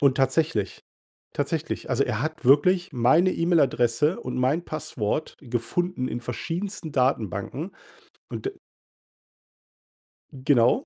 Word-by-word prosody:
Und 140 -2 +4
tatsächlich 135 - +1 0.5
tatsächlich, - - -2
also, - - +3
er 110 - -2
hat 155 -2 -4
wirklich 175 +7 +4
meine 145 +10 +4
E-Mail-Adresse 150 -3 +2
und 125 0 -5
mein 140 +7 +1
Passwort 155 -3 -3
gefunden 130 +4 -2
in 120 - -3
verschiedensten 165 - -4
Datenbanken 125 -7 -1 0.6
und - - -4
d - - -5 1.8
Genau. 135 - +3
140 Hz, 105 wpm, -25 LUFS, 125-165 Hz, 1.8 s, Und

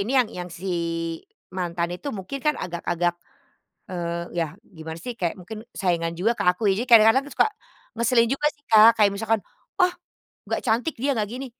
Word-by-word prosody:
ini 200 +4 -2
yang 250 -4 +4
yang 180 0 -5
si, 175 +2 -9 0.9
mantan 175 -2 -2
itu 180 +11 -6
mungkin 190 +9 -5
kan 300 - +4
agak-agak, 175 0 -1 0.8
eee, 170 -1 -4
ya 165 - +2 0.3
gimana 160 0 -7
sih, 245 - -3
kayak 175 -4 -1
mungkin 200 +4 -9 0.2
saingan 170 -3 0
juga 215 +7 +2
ke - - -2
aku 180 +4 -1
ya. - - +4
Jadi 250 - -4
kadang-kadang 230 +4 +7
suka, - - +6 0.5
ngeselin 235 0 +3
juga 285 +2 -2
sih 290 - -35
Kak. 220 0 +9
Kayak 205 -2 +5
misalkan, 225 +2 0 0.4
"ah, 360 0 +4 0.5
nggak - - -1
cantik 240 +8 +1
dia, 280 +3 +1
nggak 210 -2 -1
gini" 260 +2 -5
205 Hz, 180 wpm, -24 LUFS, 175-235 Hz, 0.9 s, Kak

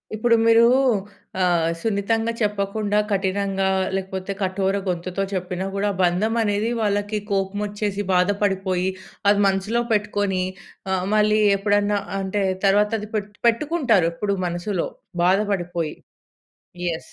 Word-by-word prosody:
ఇప్పుడు 230 +2 +3
మీరు 230 0 +6 0.8
ఆహ్, 170 -2 +2
సున్నితంగా 225 +3 0
చెప్పకుండా 205 0 0
కఠినంగా 195 0 0 0.3
లేకపోతే 190 0 -4
కఠోర 190 +1 0
గొంతుతో 180 +2 -2
చెప్పినా 185 0 -3
కూడా 200 +1 0
బంధం 185 +6 +1
అనేది 210 +1 0
వాళ్ళకి 205 0 0
కోపం 195 +1 -1
వచ్చేసి, 205 -1 -3
బాధపడిపోయి 190 -1 +1 0.4
అది 205 0 +4
మనసులో 195 +5 0
పెట్టుకొని, 205 -3 0 0.5
ఆ! - - +1 0.2
మళ్ళీ 215 0 +3 0.2
ఎప్పుడన్నా 205 0 +1 0.2
అంటే 195 +1 -1 0.2
తర్వాత 205 +2 +4
అది 210 0 -8
పెట్టు 205 0 -4
పెట్టుకుంటారు. 240 - +2
ఎప్పుడు 200 +3 -1
మనసులో, 175 +2 -2 0.4
బాధపడిపోయి. 180 -4 0 0.9
యెస్. 165 -1 -5
200 Hz, 110 wpm, -22 LUFS, 190-210 Hz, 0.9 s, మీరు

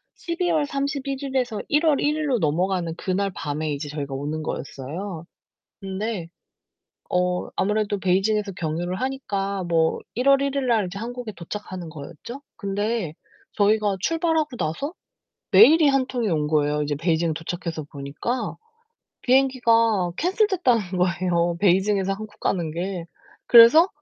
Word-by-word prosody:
12 345 +1 -2
월 305 -3 +2
31 275 -1 -2
일에서 250 -6 -1
1 300 +3 +2
월 295 -3 +4
1 300 +1 +1
일로 285 -5 0
넘어가는 170 +2 0
그날 195 +1 -1
밤에 150 0 -3
이제 145 +1 -5
저희가 140 -2 -5
오는 150 +3 -3
거였어요. 160 +6 -6 0.6
근데 195 -2 -4 0.8
어 180 0 0
아무래도 205 0 0
베이징에서 195 +2 +1
경유를 175 +2 -3
하니까 200 -8 -2
뭐 165 -1 +1 0.2
1 250 +3 0
월 275 0 +6
1 280 0 -1
일날 235 -8 +1
이제 195 +2 -7
한국에 240 -1 -6
도착하는 180 -1 -7
거였죠? 170 - -9 0.2
근데 200 -3 -2 0.4
저희가 205 -1 +2
출발하고 320 -3 0
나서 175 - -3 0.6
메일이 285 - +7
1 270 -2 +2
통이 245 -4 -2
온 150 -2 0
거예요 150 -1 +1
이제 145 0 -1
베이징 165 0 0
도착해서 165 -1 -5
보니까. 150 - -4 0.7
비행기가 230 -7 +3
캔슬됐다는 325 - +1
거에요 175 -1 +1
베이징에서 195 0 +2
한국 210 0 -10
가는 170 -4 -1
게. 175 0 -4 0.4
그래서 245 +10 +8
195 Hz, 290 characters per minute, -24 LUFS, 170-250 Hz, 0.8 s, 그래서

